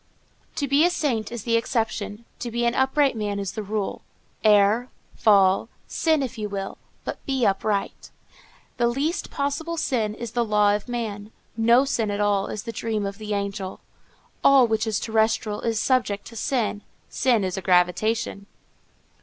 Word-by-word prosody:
"To 285 - -1
be 280 +3 +4
a 350 - +5
saint 250 -11 -1
is 235 -4 -5
the 230 -1 +1
exception; 225 -2 -2
to 240 - -4
be 235 +1 -1
an 235 - +2
upright 265 +1 +2
man 205 -2 -2
is 195 -2 -3
the 215 - -5
rule. 210 -1 -3 0.4
Err, 215 +3 +4 0.3
fall, 195 0 +4 0.2
sin 315 -3 +1
if 255 -2 -5
you 210 -1 -3
will, 195 -1 -5 0.2
but - - -6
be 265 -3 +1
upright. 200 +1 -1 0.7
"The 240 -1 +3
least 285 +9 -1
possible 300 +4 -2
sin 225 -8 0
is 235 -1 -6
the 240 0 +1
law 210 -2 +3
of 210 +4 -6
man. 215 -3 -4 0.2
No 235 +4 +4
sin 230 -6 0
at 205 0 -2
all 205 -1 +1
is 215 - -5
the 230 - -5
dream 220 -2 -2
of 200 +1 -5
the 210 -1 -3
angel. 200 -1 -4 0.6
All 275 -2 +7
which 220 0 0
is 215 -2 0
terrestrial 220 -1 0
is 225 -2 0
subject 225 -6 +1
to 230 - -13
sin. 225 -3 -1 0.3
Sin 240 -5 +1
is 185 -1 -2
a 190 - -4
gravitation." 195 +4 +1
220 Hz, 170 wpm, -24 LUFS, 205-245 Hz, 0.7 s, All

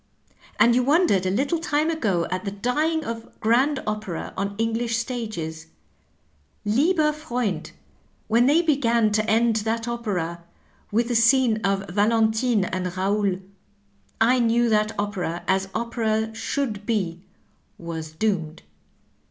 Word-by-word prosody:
And 235 - +6
you 250 - +3
wondered 265 - +3
a - - +2
little 275 - 0
time 310 -1 0
ago 200 - 0
at 185 0 -2
the 200 - -2
dying 300 +10 -1
of 230 0 -7
grand 260 +6 +2
opera 210 -5 -4
on 200 +1 -3
English 225 +1 0
stages, 215 -10 -4 1.0
lAeber 300 - +3
Frewnd^ 240 - -3 0.6
when 235 +3 +3
they 315 +5 +4
began 235 -8 +2
to 215 +1 0
end 225 0 +3
that 225 +2 -2
opera 185 -8 -3 0.5
with 230 +3 +1
the 240 - 0
scene 235 0 +4
of 195 0 0
Valentine 220 +2 +2
and 185 0 -2
Eaonl, 190 +1 -1 0.8
I 245 +3 +4
knew 235 0 +2
that 215 0 +2
opera, 185 -5 -3
as 190 0 +1
opera 220 -1 -1
shonld 225 -2 -3
be, 185 -7 -1 0.6
was 165 -2 -6
doomed. 165 -2 -2
220 Hz, 130 wpm, -24 LUFS, 195-240 Hz, 1.0 s, And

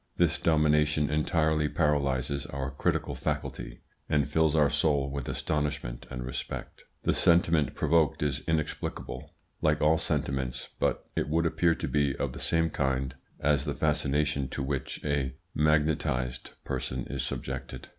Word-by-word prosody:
This 85 -3 +2
domination 75 -2 +3
entirely 75 0 +2
paralyses 70 -3 0
our 70 -1 -4
critical 70 - 0
faculty, - - -4 0.3
and 75 -1 +2
fills 80 +1 +2
our 75 -2 +4
soul 70 -2 +2
with 70 -2 -4
astonishment 75 -5 -2
and 60 -1 -5
respect. 65 0 -6 0.2
The - - +2
sentiment 85 -3 +3
provoked 80 -2 +2
is 75 -3 0
inexplicable, 80 -2 -3 0.3
like 75 -1 +3
all 80 +1 +4
sentiments, 65 -5 -2
but - - 0
it - - 0
would 85 +2 +2
appear 85 0 +3
to - - -3
be 70 -3 +1
of - - -2
the - - -7
same 80 -1 +1
kind 65 -2 0 0.3
as 70 -1 +2
the - - -2
fascination 70 -1 +1
to 65 - -4
which 70 -1 -3
a 70 -3 0 0.2
magnetised 75 -5 +1
person 65 0 -3
is 70 -1 -3
subjected. - - -5
75 Hz, 145 wpm, -29 LUFS, 70-75 Hz, 0.3 s, our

